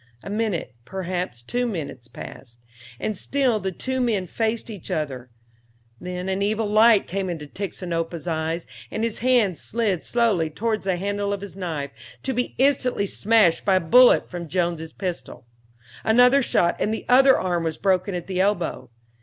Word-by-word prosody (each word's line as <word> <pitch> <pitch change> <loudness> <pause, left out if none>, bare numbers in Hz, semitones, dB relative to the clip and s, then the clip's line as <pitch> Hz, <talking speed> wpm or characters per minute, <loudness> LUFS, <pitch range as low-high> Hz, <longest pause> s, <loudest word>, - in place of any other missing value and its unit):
A 195 - -6
minute, 210 - -2
perhaps 180 -8 -4
two 245 - -1
minutes, 155 - -5
passed, 120 0 -11 0.4
and 215 +9 -2
still 255 +1 +1
the 190 -1 -3
two 260 +7 -2
men 215 -6 +1
faced 225 +4 -2
each 200 -6 -9
other; 130 -5 -3 0.7
then 180 +1 -5
an 190 +1 -1
evil 215 +2 +1
light 215 0 +5
came 190 0 -3
into 160 -4 -5
Tixinopa's 170 -1 -4
eyes, 165 0 -2 0.2
and 220 - -3
his 230 -2 -1
hand 235 -8 +2
slid 210 -6 -1
slowly 220 -9 +1
towards 215 +6 -2
the 190 -2 +1
handle 200 +2 -2
of 200 -1 -3
his 200 -2 -8
knife, 160 -7 -4 0.3
to 265 - -1
be 245 0 -2
instantly 255 -5 +2
smashed 205 -4 +3
by 195 -1 +3
a - - +5
bullet 245 +9 +6
from 175 -2 -6
Jones' 170 -2 -1
pistol. 150 -10 -6 0.6
Another 250 +5 +5
shot 175 -8 +2
and 215 - 0
the 220 - -4
other 265 +2 +6
arm 175 -2 -1
was 160 -1 -2
broken 190 -1 +1
at 175 - -4
the 185 -1 -1
elbow. 175 - -1
190 Hz, 170 wpm, -24 LUFS, 170-225 Hz, 0.7 s, bullet